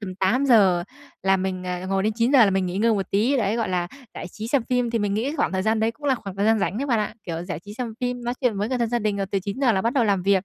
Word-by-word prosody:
tầm 190 -3 -6
8:00 195 -3 +3 0.4
là 195 0 +3
mình, 185 -1 -3
à, 180 0 -3
ngồi 195 0 0
đến 215 +2 +1
9:00 240 +2 +5
là 200 - +2
mình 190 -1 0
nghỉ 180 +2 -3
ngơi 225 +1 +3
một 195 -2 -3
tí, 225 +8 +2
đấy, 220 -2 0
gọi 230 - -1
là, 180 -1 -1 0.3
giải - - -6
trí 215 +4 -7
xem 265 -1 +2
phim 245 -2 +1
thì 230 - 0
mình 205 -2 -1
nghĩ 250 +8 -1
khoảng 290 - 0
thời 190 0 0
gian 220 +1 +1
đấy 220 +1 +2
cũng 290 +6 -17
là 270 - +3
khoảng 200 -6 -8
thời 200 +1 +1
gian 225 0 +4
rảnh 200 +1 -1
đấy 280 - -2
bạn 240 -5 +2
ạ, 210 0 -2
kiểu, 165 -1 -4
giải 180 -3 -5
trí 205 +3 -11
xem 230 -1 -5
phim, 245 -1 -3
nói 240 +1 -1
chuyện 245 -6 +1
với 205 +2 -1
người 255 0 -1
thân, 235 -1 0
gia 240 - +1
đình, 210 -2 -1
rồi 195 -1 -2
từ 195 +1 -1
9:00 225 +6 0
là 190 -2 0
bắt 230 - +1
đầu 260 -4 +2
làm 200 -4 +1
việc. 195 0 +2
210 Hz, 330 wpm, -23 LUFS, 190-240 Hz, 0.4 s, 9:00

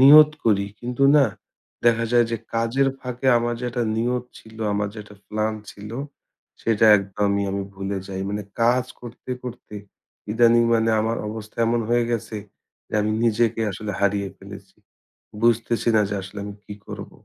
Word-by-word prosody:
নিয়ত 150 +3 +9
করি। 100 -3 +3
কিন্তু 125 +2 -3
না, 140 -4 +6 0.6
দেখা 115 0 +4
যায় 120 -1 +5
যে - - +1 0.2
কাজের 115 +4 +2
ফাঁকে 125 +1 -5
আমার 120 0 -1
যেটা 120 0 -1
নিয়ত 120 +2 0
ছিল, 110 0 -15
আমার 100 0 0
যেটা 105 0 -10
প্ল্যান 110 +1 -1 0.2
ছিল 105 +1 -10 0.7
সেটা 110 -1 +3
একদমই 100 +1 0
আমি 100 0 -1
ভুলে 95 0 -3
যাই। 95 0 -4
মানে 105 0 -3 0.2
কাজ 125 +2 +3 0.2
করতে, 125 +1 -10
করতে 120 -3 -8 0.6
ইদানিং 120 +1 +5
মানে 115 0 +2
আমার 115 +1 0
অবস্থা 110 0 -8
এমন 120 +1 +2
হয়ে 120 0 +3
গেছে 115 -1 -3 0.5
যে - - -25
আমি 110 0 0
নিজেকে 115 0 +2
আসলে 105 +1 -5
হারিয়ে 100 0 +1
ফেলেছি। 100 -1 -12 0.7
বুঝতেছি 115 0 +2
না - - +5
যে - - -1
আসলে 95 +2 -9
আমি 100 0 -7
কী 105 - -7
করব? - - -7
115 Hz, 160 wpm, -23 LUFS, 105-120 Hz, 0.7 s, নিয়ত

